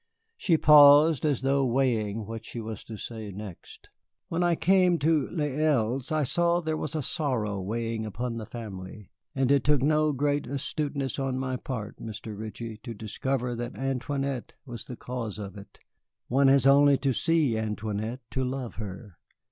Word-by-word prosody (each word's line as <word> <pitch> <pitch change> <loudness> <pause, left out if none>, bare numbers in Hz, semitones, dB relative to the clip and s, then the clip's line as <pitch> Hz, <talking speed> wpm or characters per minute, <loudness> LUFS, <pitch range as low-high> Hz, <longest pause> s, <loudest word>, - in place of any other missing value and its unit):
She 175 - +2
paused, 150 0 +7
as 140 -4 0
though 135 +1 +2
weighing 115 -5 0
what 115 +1 -7
she 120 - -7
was 110 -1 -6
to 110 - -8
say 110 -1 -6
next. 100 -2 -10 0.4
"When 170 +1 -1
I 175 -1 +3
came 180 +1 +4
to 155 -2 +1
Les 150 -5 -2
Îles 135 -4 +1
I 155 -1 +2
saw 170 +5 +2
that 175 - -9
there 160 0 0
was 155 0 -4
a 155 - -1
sorrow 120 - -1
weighing 115 +3 -3
upon 115 +3 -4
the 110 -2 -6
family; 100 -3 -8 0.2
and 135 0 +2
it 140 -2 +4
took 145 -2 +3
no 155 +1 +3
great 145 +1 0
astuteness 140 -1 -3
on 135 -1 -1
my 130 0 -2
part, 120 -4 -5
Mr. 110 -1 -7
Ritchie, 110 +1 -7
to 115 +1 -8
discover 125 +4 -2
that 120 +1 -5
Antoinette 135 0 -2
was 120 -4 -8
the 125 - -6
cause 115 -5 -5
of 100 -3 -7
it. 100 0 -12 0.5
One 135 +2 +4
has 135 -1 +5
only 140 0 +6
to 135 -1 0
see 155 -3 +2
Antoinette 110 +2 -3
to 130 - -1
love 130 -1 -4
her. 100 -2 -8
130 Hz, 175 wpm, -27 LUFS, 110-145 Hz, 0.5 s, paused